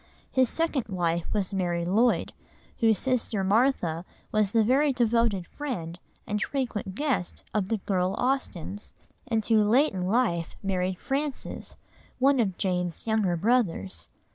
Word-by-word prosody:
His 260 Hz, -3 st, +3 dB
second 325 Hz, -6 st, 0 dB
wife 170 Hz, -4 st, -1 dB
was 200 Hz, -2 st, -1 dB
Mary 175 Hz, -3 st, 0 dB
Lloyd, 220 Hz, +7 st, +2 dB, 0.5 s
whose 225 Hz, -4 st, +4 dB
sister 240 Hz, -6 st, 0 dB
Martha 195 Hz, -6 st, +2 dB, 0.3 s
was 215 Hz, -2 st, +2 dB
the 225 Hz, +2 st, +3 dB
very 275 Hz, +6 st, +3 dB
devoted 230 Hz, -6 st, +1 dB
friend, 180 Hz, -, -5 dB, 0.3 s
and 210 Hz, 0 st, -2 dB
frequent 235 Hz, -9 st, -2 dB
guest, 270 Hz, -, -1 dB
of 205 Hz, -3 st, 0 dB
the 225 Hz, -, +1 dB
girl 185 Hz, -2 st, 0 dB
Austens, 215 Hz, -, -2 dB, 0.3 s
and 225 Hz, -3 st, 0 dB
who 220 Hz, -2 st, +4 dB
late 250 Hz, +8 st, +3 dB
in 180 Hz, -1 st, -2 dB
life 190 Hz, -7 st, +1 dB
married 185 Hz, -1 st, -1 dB
Francis, 275 Hz, +5 st, -4 dB, 0.4 s
one 270 Hz, +1 st, +4 dB
of 195 Hz, -6 st, 0 dB
Jane's 180 Hz, -3 st, -1 dB
younger 215 Hz, -5 st, +1 dB
brothers. 165 Hz, -, 0 dB
210 Hz, 140 wpm, -27 LUFS, 180-250 Hz, 0.5 s, whose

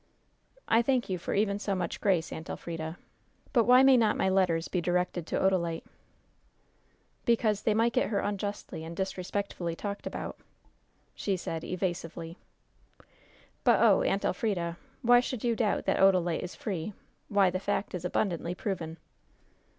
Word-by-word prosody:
"I 225 Hz, -, +5 dB
thank 250 Hz, -1 st, +1 dB
you 180 Hz, -, -1 dB
for -, -, -3 dB
even 200 Hz, 0 st, +1 dB
so 200 Hz, -1 st, -1 dB
much 185 Hz, -, -3 dB
grace, 180 Hz, -5 st, +1 dB
Aunt 160 Hz, -, -7 dB
Elfrida; 165 Hz, 0 st, -5 dB, 0.6 s
but 235 Hz, -4 st, +4 dB
why 250 Hz, +2 st, +7 dB
may 270 Hz, -1 st, +7 dB
not 220 Hz, -3 st, +3 dB
my 190 Hz, -, +2 dB
letters 180 Hz, -4 st, +2 dB
be 180 Hz, -, -1 dB
directed 175 Hz, -1 st, -1 dB
to -, -, -1 dB
Odalite?" 170 Hz, -4 st, +1 dB, 1.4 s
"Because 220 Hz, -3 st, +2 dB
they 215 Hz, -, +1 dB
might 230 Hz, +2 st, +2 dB
get 255 Hz, -, +1 dB
her 205 Hz, -, +1 dB
unjustly 205 Hz, -5 st, -4 dB
and 165 Hz, +1 st, -8 dB
disrespectfully 190 Hz, -2 st, -3 dB
talked 200 Hz, +3 st, -5 dB
about," -, -, -5 dB, 0.8 s
said 175 Hz, -4 st, -2 dB
she, -, -, -7 dB
evasively. 170 Hz, -2 st, -3 dB, 1.3 s
"But, -, -, +5 dB
oh, -, -, +5 dB
Aunt 195 Hz, -, 0 dB
Elfrida! 175 Hz, -5 st, -1 dB, 0.3 s
why 245 Hz, +1 st, +7 dB
should 250 Hz, -2 st, -3 dB
you 235 Hz, -1 st, +2 dB
doubt 220 Hz, -3 st, 0 dB
that -, -, +1 dB
Odalite 180 Hz, -3 st, +4 dB
is 180 Hz, -, -6 dB
free? 205 Hz, -, -4 dB, 0.4 s
Why, 200 Hz, -3 st, +4 dB
the 185 Hz, -, -2 dB
fact 205 Hz, +1 st, -2 dB
is 180 Hz, -2 st, -4 dB
abundantly 180 Hz, -2 st, -1 dB
proven." 170 Hz, -5 st, -4 dB
190 Hz, 155 wpm, -29 LUFS, 170-215 Hz, 1.4 s, why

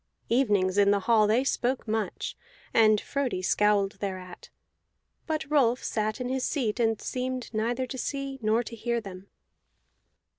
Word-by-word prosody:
Evenings 205 Hz, -6 st, +2 dB
in 200 Hz, 0 st, +5 dB
the 200 Hz, 0 st, +3 dB
hall 220 Hz, 0 st, +4 dB
they 230 Hz, +5 st, +3 dB
spoke 255 Hz, -2 st, -1 dB
much, 220 Hz, -1 st, -2 dB, 0.4 s
and 215 Hz, -2 st, +5 dB
Frodi 260 Hz, -9 st, -2 dB
scowled 205 Hz, 0 st, +2 dB
thereat; 185 Hz, -3 st, -6 dB, 0.8 s
but 310 Hz, -3 st, -1 dB
Rolf 260 Hz, -5 st, +2 dB
sat 215 Hz, +1 st, -1 dB
in 250 Hz, -, -3 dB
his 260 Hz, 0 st, -1 dB
seat 240 Hz, -6 st, -1 dB
and 225 Hz, -2 st, +2 dB
seemed 255 Hz, -1 st, -4 dB
neither 235 Hz, +4 st, 0 dB
to 260 Hz, +1 st, -7 dB
see 275 Hz, 0 st, -4 dB
nor 220 Hz, +2 st, +2 dB
to 230 Hz, -, -8 dB
hear 235 Hz, +1 st, -1 dB
them. 195 Hz, -3 st, -10 dB
230 Hz, 150 wpm, -27 LUFS, 210-255 Hz, 0.8 s, in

